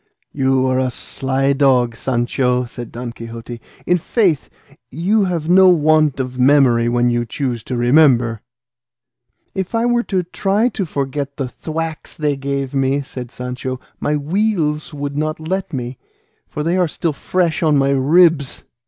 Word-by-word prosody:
"You 130 -1 +2
are 130 0 +1
a 130 -1 +1
sly 135 +2 -1
dog, 130 -4 +2
Sancho," 125 +1 0
said 120 0 -9
Don 120 0 -6
Quixote; 115 0 -9 0.3
"i' 180 - +4
faith, 175 - 0 0.4
you 195 - +1
have 170 -4 -2
no 185 +2 +6
want 155 -4 +3
of 130 -1 -4
memory 125 -3 +4
when 120 0 +2
you 120 0 0
choose 120 0 -3
to 125 - -3
remember." 120 -3 +3 1.1
"If 190 +3 -3
I 230 +1 +1
were 240 0 +2
to 190 -6 -1
try 200 +6 0
to 195 -5 -3
forget 140 -1 -3
the 135 -3 -2
thwacks 160 +4 -5
they 150 -2 0
gave 140 0 -3
me," 135 +1 +1
said 125 -3 -8
Sancho, 125 0 -5 0.2
"my 150 0 0
weals 155 -1 -1
would 145 -1 -5
not 155 +1 -2
let 185 +4 -3
me, 125 -3 -5 0.5
for 150 - -4
they 170 +3 +1
are 180 -2 +2
still 160 +1 -2
fresh 170 +3 -1
on 155 -3 +3
my 140 0 +2
ribs." 145 +1 +3
140 Hz, 160 wpm, -18 LUFS, 125-165 Hz, 1.1 s, no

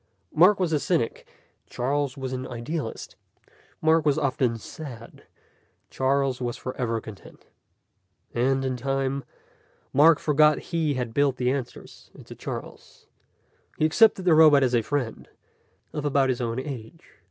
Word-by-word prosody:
Mark 185 +6 +5
was 175 -3 0
a 150 - +2
cynic, 155 -7 -1 0.4
Charles 140 +2 -2
was 130 -1 -4
an 130 0 -4
idealist. 120 +2 -5 0.7
Mark 160 0 +4
was 150 -1 +2
often 130 -5 0
sad; 115 -1 -10 0.7
Charles 135 -1 0
was 120 -1 -3
forever 125 -3 -3
content. 110 -3 -13 0.9
And 135 +2 +1
in 130 -1 -2
time, 135 +1 -2 0.7
Mark 155 +3 +6
forgot 150 0 +3 0.2
he 160 -4 +1
had 125 -3 -3
built 140 -1 +2
the 125 0 +1
answers 135 -3 -7
into - - -12
Charles. - - -9 0.7
He 155 - +2
accepted 195 +3 +4
the 175 - +5
robot 155 -3 +7
as 125 -1 +1
a 120 - +3
friend, 130 -2 -4 0.6
of 150 - -4
about 140 -2 +2
his 125 -1 -1
own 115 +1 -2
age. 130 +2 -9
135 Hz, 140 wpm, -25 LUFS, 125-150 Hz, 0.9 s, robot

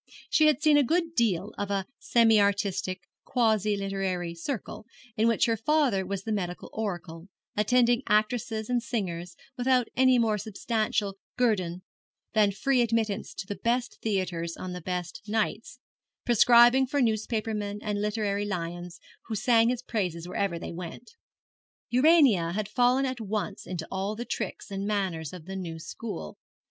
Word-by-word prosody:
She 310 - +5
had 305 0 +2
seen 305 -2 +6
a 290 - +5
good 330 +5 0
deal 210 - +1
of 205 0 -2
a 195 -1 -1
semi 225 -3 +4
artistic, 200 -2 0 0.2
quasi 215 -4 +1
literary 195 -3 -2
circle, 215 +4 -5 0.3
in 220 +2 +2
which 230 - +3
her 230 - +1
father 225 -5 +1
was 195 0 -3
the 220 - -4
medical 180 -4 -3
oracle, 175 -5 -5 0.3
attending 240 +3 +3
actresses 220 +1 +1
and 245 -1 +1
singers 180 -7 -4 0.2
without 250 -1 +2
any 260 0 +5
more 220 -3 +2
substantial 215 -1 -2 0.2
guerdon 185 -8 0 0.5
than 210 -2 +4
free 250 +5 +1
admittance 225 -3 0
to - - -5
the 205 - -5
best 245 +1 -1
theatres 180 -5 -2
on 185 -1 -5
the 180 - -6
best 180 -1 -4
nights; 220 +2 -2 0.5
prescribing 240 +2 +6
for 285 +3 -1
newspaper 220 -2 0
men 205 -1 -3
and 205 -1 -2
literary 210 -1 -1
lions, 175 -2 -5 0.3
who 225 - -3
sang 230 +1 +4
his 250 0 -2
praises 180 -8 -2
wherever 180 -1 -1
they - - -6
went. 175 - -8 0.8
Urania 250 - +5
had 210 +1 -2
fallen 245 +5 +3
at 255 -2 -3
once 210 -1 -4
into 170 -3 -5
all 195 +2 -2
the 240 +2 -5
tricks - - -5
and 195 +1 -3
manners 185 -7 -1
of 180 -4 -10
the 190 +1 -6
new 170 -4 -5
school. 160 - -7
210 Hz, 155 wpm, -28 LUFS, 185-235 Hz, 0.8 s, seen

